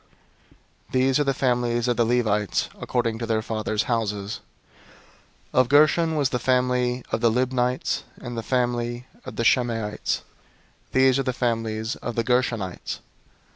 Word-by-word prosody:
These 130 +1 +3
are - - +4
the 140 - +1
families 120 -2 +1
of 120 - +2
the 120 - +2
Levites 110 -4 +1
according 115 -3 -1
to 115 - -3
their 110 -1 0
fathers' 110 -1 -1
houses. 105 -3 -2 1.1
003:021 - - +4
Of 130 -1 +4
Gershon 155 +3 +4
was 145 -4 +2
the 125 - -1
family 125 0 +1
of 110 - 0
the 115 - +5
Libnites, 125 +1 0 0.2
and 120 -1 -6
the 115 - -2
family 120 0 -1 0.2
of - - -7
the 115 - -1
Shimeites: 115 -4 +1 0.7
these 130 0 +4
are 135 -1 0
the - - 0
families 115 -1 -1
of 120 - -5
the 115 - +1
Gershonites. 115 -6 -1
120 Hz, 150 wpm, -24 LUFS, 115-130 Hz, 1.1 s, the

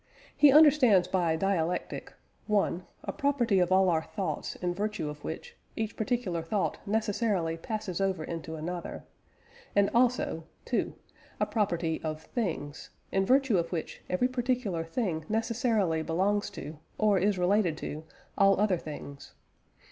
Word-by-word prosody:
He 295 -2 +7
understands 270 - +6
by 175 -4 +1
"dialectic" 180 -1 -1 0.4
(1) 200 -4 +1 0.2
a - - -4
property 270 -9 +2
of 180 0 +2
all 190 0 +5
our 165 -3 +3
thoughts 165 -2 -4
in 175 -1 -2
virtue 210 -3 -2
of 150 0 -9
which, 160 - -6 0.2
each 220 -1 -3
particular 220 -7 -1
thought 190 +5 -1
necessarily 205 -5 0
passes 200 +1 -4
over 190 -4 0
into 160 0 -5
another; 170 +3 -5 0.7
and 200 0 +4
also 240 -9 +2 0.2
(2) - - -1 0.4
a - - +3
property 175 -7 -1
of 155 0 -4
things, 160 - -4 0.2
in 195 0 +1
virtue 260 -7 +4
of 170 - -3
which 165 -3 -4
every 180 +8 +2
particular 245 -8 -1
thing 165 -2 -2
necessarily 220 -6 +1
belongs 195 +6 0
to, 150 +2 -8 0.2
or 210 -3 +3
is 200 +1 +2
related 180 -2 +2
to, 155 0 -5 0.3
all 195 -1 +4
other 205 -3 +3
things. 140 -3 -9
190 Hz, 140 wpm, -29 LUFS, 165-220 Hz, 0.7 s, He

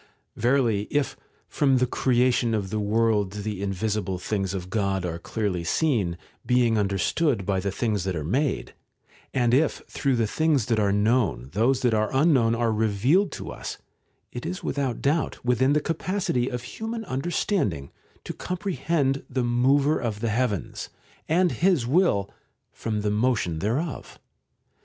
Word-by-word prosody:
§ - - -28 0.3
8. - - -11
Verily 115 -4 +2
if 145 -2 0 0.2
' - - -38
from 135 -3 +4
the 125 - +3
creation 120 -2 +2
of 100 -3 -3
the 110 - -1
world 105 -2 +1
the 105 -1 -4
in 100 -1 -1
visible 100 -1 -2
things 95 +1 -2
of 90 -1 -6
God 95 -3 0
are 85 -1 -4
clearly 95 -2 -2
seen, 100 - +1 0.3
being 125 -2 +3
understood 100 - +1
by 95 -1 0
the 100 +2 -2
things 105 -2 -1
that 95 -1 -2
are 80 - -3
made', 130 - -1 0.6
and 120 -2 +1
if 150 +4 +2
through 135 -2 0
the 115 -2 +1
things 150 +1 +1
that 115 -1 +1
are 100 -1 +2
known 100 - +1
those 120 +6 +2
that 120 -2 +3
are 110 0 +1
unknown 135 -6 +4
are 115 -1 +1
revealed 110 - +2
to - - -6
us, - - -6 0.5
it 120 - -6
is 180 +3 -5
without 135 -3 -2
doubt 145 -2 0
within 125 +3 +3
the 150 - +3
capacity 165 -5 -1
of 125 -1 -4
human 225 - -5
understanding 130 - -1 0.3
to - - -5
comprehend 165 -6 -1
the 130 -1 -1
Mover 135 +5 +3
of 110 -3 -3
the 115 0 -1
heavens, 110 - -2 0.4
and 175 +2 +3
His 175 -8 +2
will, 130 - +2 0.4
from 110 -2 -3
the 105 0 0
motion 105 -7 0
thereof. 130 - -3
120 Hz, 165 wpm, -25 LUFS, 100-140 Hz, 0.6 s, from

